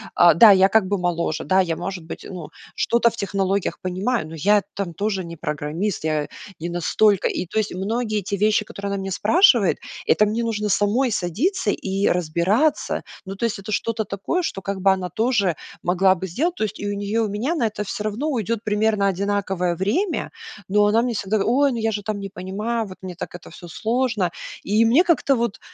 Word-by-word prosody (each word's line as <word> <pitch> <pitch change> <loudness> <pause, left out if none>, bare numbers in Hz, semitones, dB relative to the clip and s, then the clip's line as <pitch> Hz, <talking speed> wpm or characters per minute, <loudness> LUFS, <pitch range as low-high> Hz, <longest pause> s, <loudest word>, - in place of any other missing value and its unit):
а, 175 -2 +7
да, 210 +5 +8
я 190 0 +5
как 220 -2 +3
бы 200 0 0
моложе. 170 -3 -1
Да, 190 0 +2
я, 170 -3 +1
может 180 -1 -5
быть, - - -8
ну, 175 -5 -7 0.3
что-то 235 0 +2
в - - -11
технологиях 195 -1 -1
понимаю, 185 +1 -1
но 165 - -8
я 205 +6 +3
там 190 -4 -3
тоже 195 0 -2
не 170 0 -8
программист, 155 +5 -3
я 155 -2 0 0.3
не 170 +2 -4
настолько 190 +3 +2
И 180 - -2
то - - -5
есть 215 -3 0
многие 215 +2 -1
те 200 +1 -3
вещи, 210 +1 +2
которые 200 -1 -6
она - - -1
меня 195 - -4
спрашивает,- 230 - +4 0.3
это 210 - +4
мне 230 +3 -1
нужно 210 -2 -1
самой 220 +6 +2
садиться 210 - 0
и 195 +1 -1
разбираться. 180 - +1 0.2
Ну, 195 +1 -6
то 235 - -2
есть 220 - -1
это 200 +2 -8
что-то 225 +1 -1
такое, 200 - -2
что 195 - -3
как 195 0 -4
бы 195 0 +5
она 180 -1 -4
тоже 215 -5 +1 0.3
могла 185 +2 +3
бы 190 +2 -5
сделать. 325 - -1
То - - -2
есть 215 0 -3
и 205 - -5
у 205 - -1
неё, 205 +3 -1
и - - 0
у - - -6
меня 245 +12 -1
на 240 - +1
это 210 0 -4
всё 210 - -5
равно 215 +8 -2
уйдет 230 -4 -1
примерно 210 -1 +1
одинаковое 195 -2 -1
время. 310 - -1 0.4
Но 205 +2 +3
она 220 +3 +3
мне 240 -2 -1
всегда: 200 +1 0
"Ой, 275 +4 +3
ну 235 - -3
я 225 0 0
же 205 -1 -4
там 210 -1 -3
не 195 0 -6
понимаю, 215 +5 -3
вот 185 - -11
мне 185 -2 -7
так 180 - -7
это 175 - -10
всё 175 - -12
сложно". 225 0 0 0.3
И 215 +3 +3
мне 260 +10 +5
как-то 320 -6 +2
вот, 235 -3 -2
200 Hz, 215 wpm, -22 LUFS, 185-225 Hz, 0.4 s, да